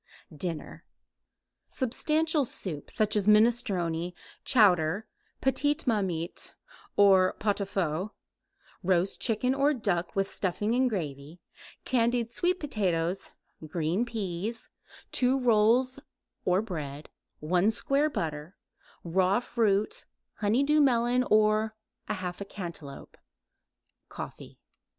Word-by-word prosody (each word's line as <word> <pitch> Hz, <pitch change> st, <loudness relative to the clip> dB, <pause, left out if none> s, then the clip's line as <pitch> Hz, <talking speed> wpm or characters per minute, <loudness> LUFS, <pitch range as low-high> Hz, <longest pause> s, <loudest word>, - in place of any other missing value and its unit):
DINNER 165 Hz, 0 st, -5 dB, 0.8 s
Substantial 305 Hz, +4 st, +1 dB
soup 175 Hz, -, -5 dB
such 215 Hz, 0 st, +1 dB
as 205 Hz, -1 st, +1 dB
minestrone, 200 Hz, -7 st, +2 dB, 0.3 s
chowder, 195 Hz, -, +4 dB, 0.4 s
petite 275 Hz, +2 st, +1 dB
marmite 190 Hz, -8 st, -2 dB, 0.4 s
or 190 Hz, -2 st, +6 dB
pot 205 Hz, -1 st, -1 dB
au -, -, 0 dB
feu; 185 Hz, -1 st, -2 dB, 0.7 s
roast 185 Hz, 0 st, +1 dB
chicken 250 Hz, +2 st, +1 dB
or 280 Hz, +2 st, +2 dB
duck 180 Hz, -8 st, -1 dB
with 195 Hz, 0 st, +1 dB
stuffing 205 Hz, +4 st, -1 dB
and 255 Hz, +1 st, +3 dB
gravy; 155 Hz, -, -5 dB, 0.5 s
candied 235 Hz, -2 st, +1 dB
sweet 360 Hz, +5 st, +1 dB
potatoes; 185 Hz, -, -1 dB, 0.3 s
green 165 Hz, +6 st, 0 dB
peas; 220 Hz, -1 st, -4 dB, 0.4 s
2 255 Hz, +1 st, +3 dB
rolls 245 Hz, +2 st, +3 dB, 0.5 s
or 185 Hz, +3 st, +2 dB
bread; 150 Hz, -7 st, -6 dB, 0.3 s
1 180 Hz, +6 st, +2 dB
square 275 Hz, +6 st, +1 dB
butter; 155 Hz, -, -4 dB, 0.5 s
raw 185 Hz, +4 st, +2 dB
fruit, 215 Hz, -4 st, 0 dB, 0.3 s
honey 220 Hz, +5 st, +2 dB
dew 300 Hz, +2 st, +3 dB
melon 245 Hz, -2 st, +3 dB
or 215 Hz, 0 st, +3 dB, 0.3 s
1/2 185 Hz, +1 st, -4 dB
cantaloupe; 170 Hz, -7 st, -8 dB, 0.9 s
coffee. -, -, -9 dB
205 Hz, 100 wpm, -28 LUFS, 175-240 Hz, 0.9 s, or